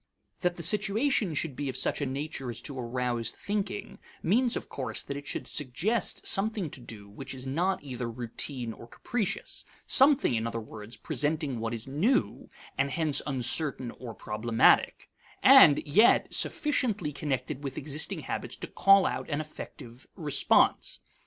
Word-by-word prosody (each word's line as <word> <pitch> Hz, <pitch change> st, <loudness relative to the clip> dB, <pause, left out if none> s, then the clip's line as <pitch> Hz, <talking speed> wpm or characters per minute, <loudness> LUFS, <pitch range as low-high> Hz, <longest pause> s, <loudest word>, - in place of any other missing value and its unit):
That 180 Hz, -1 st, 0 dB
the 170 Hz, -, -7 dB
situation 210 Hz, -, +2 dB
should 145 Hz, -2 st, -2 dB
be 145 Hz, 0 st, -3 dB
of 130 Hz, -, -4 dB
such 130 Hz, -, 0 dB
a 140 Hz, -, 0 dB
nature 135 Hz, -1 st, -4 dB
as 120 Hz, -1 st, -6 dB
to 140 Hz, -3 st, -5 dB
arouse 120 Hz, -1 st, -2 dB
thinking 205 Hz, 0 st, -4 dB, 0.2 s
means 240 Hz, +7 st, +2 dB
of -, -, -7 dB
course 125 Hz, -5 st, -4 dB
that 140 Hz, -, -6 dB
it 140 Hz, 0 st, -8 dB
should -, -, -4 dB
suggest 170 Hz, -, -1 dB
something 200 Hz, -5 st, +1 dB
to -, -, -8 dB
do 105 Hz, -4 st, -10 dB
which 130 Hz, +6 st, -8 dB
is 130 Hz, 0 st, -6 dB
not 170 Hz, +8 st, -1 dB
either 125 Hz, -4 st, -5 dB
routine 120 Hz, +1 st, -4 dB
or 115 Hz, -, -13 dB
capricious 200 Hz, -, -4 dB, 0.2 s
something, 275 Hz, -, +5 dB
in 115 Hz, 0 st, -1 dB
other 115 Hz, 0 st, -3 dB
words, 110 Hz, 0 st, -10 dB
presenting 150 Hz, -4 st, -1 dB
what 115 Hz, 0 st, -3 dB
is 115 Hz, -1 st, -5 dB
new 170 Hz, -, 0 dB, 0.3 s
(and 140 Hz, 0 st, +2 dB
hence 155 Hz, 0 st, +1 dB
uncertain 130 Hz, -1 st, 0 dB
or 120 Hz, -4 st, -9 dB
problematic) 115 Hz, +2 st, +2 dB, 0.4 s
and 145 Hz, 0 st, +8 dB
yet 205 Hz, +11 st, +4 dB
sufficiently 220 Hz, -, 0 dB
connected 140 Hz, -1 st, -3 dB
with 135 Hz, -1 st, -5 dB
existing 150 Hz, +2 st, -1 dB
habits -, -, -4 dB
to -, -, -7 dB
call 195 Hz, -1 st, +5 dB
out -, -, -3 dB
an 145 Hz, -1 st, -1 dB
effective 130 Hz, -5 st, -10 dB
response. 150 Hz, -6 st, +2 dB
140 Hz, 160 wpm, -28 LUFS, 125-180 Hz, 0.4 s, and